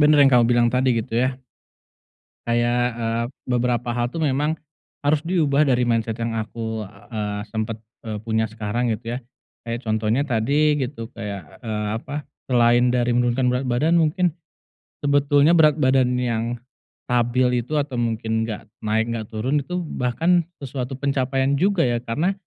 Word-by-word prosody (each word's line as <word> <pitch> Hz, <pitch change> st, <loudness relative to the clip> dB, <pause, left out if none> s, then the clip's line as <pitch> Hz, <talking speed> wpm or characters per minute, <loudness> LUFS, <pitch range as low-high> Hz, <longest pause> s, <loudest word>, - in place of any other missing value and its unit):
bener 150 Hz, 0 st, +6 dB
yang 135 Hz, -, +5 dB
kamu 120 Hz, -1 st, +6 dB
bilang 120 Hz, -1 st, +4 dB
tadi, 130 Hz, -1 st, +2 dB
gitu 115 Hz, 0 st, -3 dB
ya. 130 Hz, 0 st, 0 dB, 1.1 s
Kayak, 120 Hz, +1 st, +2 dB
eee, 115 Hz, 0 st, -1 dB, 0.3 s
beberapa 120 Hz, -1 st, 0 dB
hal 120 Hz, 0 st, 0 dB
tuh 165 Hz, -, -4 dB
memang 150 Hz, +3 st, +1 dB, 0.5 s
harus 145 Hz, +1 st, +2 dB
diubah, 155 Hz, -5 st, +2 dB
dari 125 Hz, -1 st, +3 dB
mindset 115 Hz, -1 st, 0 dB
yang 115 Hz, -1 st, -2 dB
aku, 110 Hz, 0 st, -4 dB
eee, 105 Hz, 0 st, -5 dB
sempat, 110 Hz, 0 st, -2 dB, 0.3 s
eee, 105 Hz, -1 st, -4 dB
punya 110 Hz, 0 st, 0 dB
sekarang, 110 Hz, +2 st, -2 dB
gitu 115 Hz, +2 st, -5 dB
ya. -, -, -2 dB, 0.5 s
Kayak 115 Hz, 0 st, -3 dB
contohnya 110 Hz, +5 st, +1 dB
tadi 145 Hz, +4 st, +2 dB
gitu, 125 Hz, -2 st, -4 dB
kayak, 100 Hz, -7 st, -7 dB
eee, 105 Hz, -2 st, -2 dB
apa, 145 Hz, +3 st, -6 dB, 0.2 s
selain 120 Hz, 0 st, +4 dB
dari 120 Hz, -1 st, +1 dB
menurunkan 120 Hz, +1 st, +2 dB
berat 125 Hz, +2 st, -1 dB
badan, 150 Hz, +8 st, +2 dB
mungkin 165 Hz, +2 st, +2 dB, 0.7 s
sebetulnya 145 Hz, +1 st, +4 dB
berat 155 Hz, -2 st, +6 dB
badan 130 Hz, -1 st, +3 dB
yang 115 Hz, -2 st, 0 dB, 0.7 s
stabil 125 Hz, 0 st, +2 dB
itu 155 Hz, -, -7 dB
atau 140 Hz, -4 st, -1 dB
mungkin 110 Hz, -1 st, -1 dB
nggak 110 Hz, -1 st, -6 dB, 0.2 s
naik, 110 Hz, +1 st, +2 dB
nggak 115 Hz, -2 st, -3 dB
turun, 130 Hz, +7 st, 0 dB
itu 180 Hz, +2 st, -3 dB
bahkan 165 Hz, +4 st, +1 dB, 0.2 s
sesuatu 130 Hz, -1 st, -4 dB
pencapaian 135 Hz, 0 st, 0 dB
juga, 190 Hz, +1 st, +2 dB
ya, 120 Hz, -1 st, +1 dB
karena, 150 Hz, +11 st, 0 dB
125 Hz, 155 wpm, -22 LUFS, 115-140 Hz, 1.1 s, bener